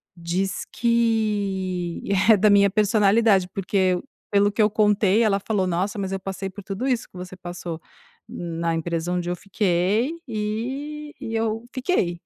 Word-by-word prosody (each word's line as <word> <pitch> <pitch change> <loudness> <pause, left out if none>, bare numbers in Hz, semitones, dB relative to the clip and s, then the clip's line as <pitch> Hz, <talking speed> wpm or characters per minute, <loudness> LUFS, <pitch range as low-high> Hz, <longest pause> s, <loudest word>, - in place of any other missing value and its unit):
diz 180 +2 -2
que 205 -7 0 0.3
é - - +8
da 210 +1 +4
minha 200 0 +6
personalidade, 210 -1 +3
porque 185 -2 +1 0.3
pelo 205 0 +4
que 205 - 0
eu 210 0 +4
contei, 210 -1 +3
ela 205 -3 +3
falou: 200 -2 -1
"Nossa, 185 +4 -1
mas 195 -1 -3
eu 195 - -2
passei 195 0 -5
por 200 +2 -10
tudo 200 +7 -3
isso 250 -3 0
que - - -25
você 180 0 -8
passou 175 -2 -6 0.5
na 165 -1 -3
empresa 165 +1 -2
onde 175 -1 -2
eu 175 - -1
fiquei 200 - +1 0.2
e 260 +8 -4
e 225 - -5
eu 225 0 -1
fiquei", 250 - 0
200 Hz, 155 wpm, -23 LUFS, 180-220 Hz, 0.5 s, é